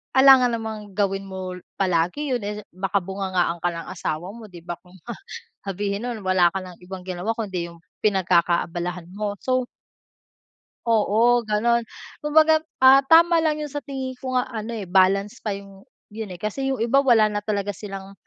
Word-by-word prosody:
alangan 265 -2 +7
namang 215 -2 -6
gawin 195 0 -1
mo 185 -1 -6 0.2
palagi 185 - 0
yun, 230 - -10
eh, 210 +1 -4
baka 195 +2 0
bungangaan 185 -2 -1
ka - - +4
ng 165 0 -7
asawa 170 -1 -4
mo 230 -2 -10
di 175 -2 -11
ba, 175 0 -5
kung 180 +3 -21 0.2
ma - - -2 0.6
sabihin 200 +2 -2
nun, 235 -2 -4
"Wala 185 -2 +4
ka - - -1
ng 180 -2 -11
ibang 185 0 -8
ginawa 185 +2 -4
kundi 185 -6 -3
yung 170 - -15 0.2
pinagkakaabalahan 175 -2 +1
mo," 205 0 -3
so 255 -1 0 1.2
oo 230 +2 +3
ganon 235 +3 +2 0.4
kumbaga, 315 +1 +4 0.2
ah, 265 +1 +7
tama 330 +4 +5
lang 310 -2 +1
yung 300 -2 -5
sa 290 - -3
tingin 265 -2 -5
ko 255 -1 -1
nga 250 - +1
ano, 220 0 -4
eh, 205 - -5
balance 195 +5 +2
pa 220 - -3
yung 195 -1 -13 0.3
yun, 220 -1 -5
eh, 180 - -7
kasi 215 +8 -3
yung 265 - -1
iba 240 +5 +3
wala 240 -5 +5
na 210 -1 -1
talaga 205 -1 -2
silang 195 0 -8
205 Hz, 175 wpm, -23 LUFS, 185-245 Hz, 1.2 s, alangan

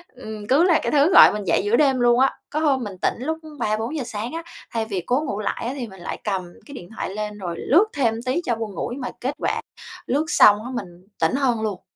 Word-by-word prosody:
ừ, 220 -4 -8
cứ 285 +6 +5
là 345 -3 +4
cái - - -1
thứ 295 +5 +4
gọi - - +9
mình 210 -1 -4
dậy 175 - +2
giữa 210 +3 +3
đêm 270 -2 +3
luôn 240 0 +4
á. 265 +1 +3 0.2
Có 305 - -2
hôm 280 -5 +1
mình 200 -4 -7
tỉnh - - +2
lúc 320 +6 -2 0.2
3:00-4:00 225 +7 -1
sáng 230 +3 -5
á, 330 0 -4 0.3
thay 225 -1 -1
vì 195 -4 -3
cố 255 +4 +1
ngủ 210 -6 -3
lại 215 - -3
á 260 - -2
thì 245 -4 -4
mình 190 -3 -13
lại - - -5
cầm 195 -3 -1 0.2
cái 285 - -11
điện 175 -9 -10
thoại - - -3
lên 210 0 -4
rồi 175 -4 -5
lướt 350 +10 +4
thêm 240 -6 +1
tí 260 +7 0
cho 235 - 0
buồn 220 -3 -5
ngủ, - - -3
nhưng 275 - -7
mà 250 - -4
kết 265 +3 -2
quả - - -1 0.4
lướt 290 +4 0
xong 210 -10 +6
á 255 - -6
mình 180 -5 -8
tỉnh 165 +9 +2
hơn 250 -5 +1
luôn. 210 -4 -3
240 Hz, 260 wpm, -22 LUFS, 210-275 Hz, 0.4 s, gọi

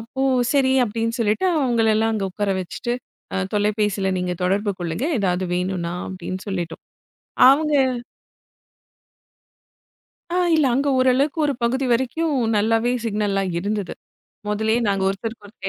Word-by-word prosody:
அப்போ, 230 +4 -7 0.3
சரி 275 -2 +3
அப்படின்னு 230 +1 -2
சொல்லிட்டு 220 - +1
அவங்களை 235 -6 +2
எல்லாம் 225 +1 +1
அங்க 205 -3 -1
உக்கார 205 +2 -2
வச்சிட்டு 210 +7 -4 0.4
அ - - 0 0.2
தொலைபேசியில 210 -1 0
நீங்கத் 180 -1 -3
தொடர்பு 200 +3 +1
கொள்ளுங்க. 170 +7 -3
ஏதாவது, 185 -2 0
வேணுன்னா 180 -1 -2 0.2
அப்படின்னு 185 0 -6
சொல்லிட்டோம். 175 -4 -4 0.7
அவங்க 300 +3 +4 2.6
அ, - - 0 0.2
இல்ல, 310 -3 +3
அங்க 280 +2 +1
ஒரு 255 0 +4
அளவுக்கு 280 +5 0
ஒரு 285 - 0
பகுதி 260 +3 +1
வரைக்கும் 275 +6 0 0.2
நல்லாவே 225 +3 +2
சிக்னல்லாம் 200 -3 0
இருந்தது. 200 0 -3 0.6
முதலயே, 220 +3 +1
நாங்க 195 -1 0
ஒருத்தருக்கு 210 +3 -5
ஒருத்தர் 195 -2 -7
210 Hz, 130 wpm, -22 LUFS, 195-240 Hz, 2.6 s, அவங்க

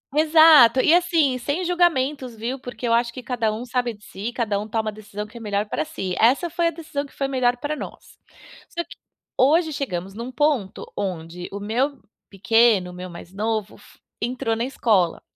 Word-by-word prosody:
Exato. 310 -6 +7
E, 315 - +5
assim, 325 -7 +3
sem 290 +9 -2
julgamentos, 295 -8 +1
viu, 240 +5 -4
porque 245 -1 -6
eu 230 - +2
acho 235 0 +2
que 255 - -8
cada 235 -3 -1
um 235 +3 -5
sabe 245 -1 -1
de 205 0 -19
si, 210 +5 -5
cada 225 -4 -1
um 210 - -5
toma 220 0 -1
a - - -4
decisão 210 0 -7
que 235 - -13
é - - -9
melhor 205 -1 -1
pra - - -1
si. 195 -13 -4
Essa 270 +9 +3
foi 340 +1 0
a - - +3
decisão 305 -3 -5
que - - -17
foi 275 - -2
melhor 250 -2 +1
pra 290 +4 -3
nós. - - -10 0.5
Só 340 - -3
que 335 - -14 0.4
hoje 310 +4 +3
chegamos 195 -9 -4
num 235 +4 -6
ponto 265 -8 -1
onde 175 -2 -5
o 200 - -5
meu 250 +7 -1 0.3
pequeno, 210 -2 +3
o - - -12
meu 180 0 -7
mais 170 +1 -11
novo, 215 0 -2
fo - - -20 0.2
entrou 240 -1 -1
na 230 - -2
escola. 210 -10 +1
240 Hz, 205 wpm, -23 LUFS, 210-285 Hz, 0.5 s, Exato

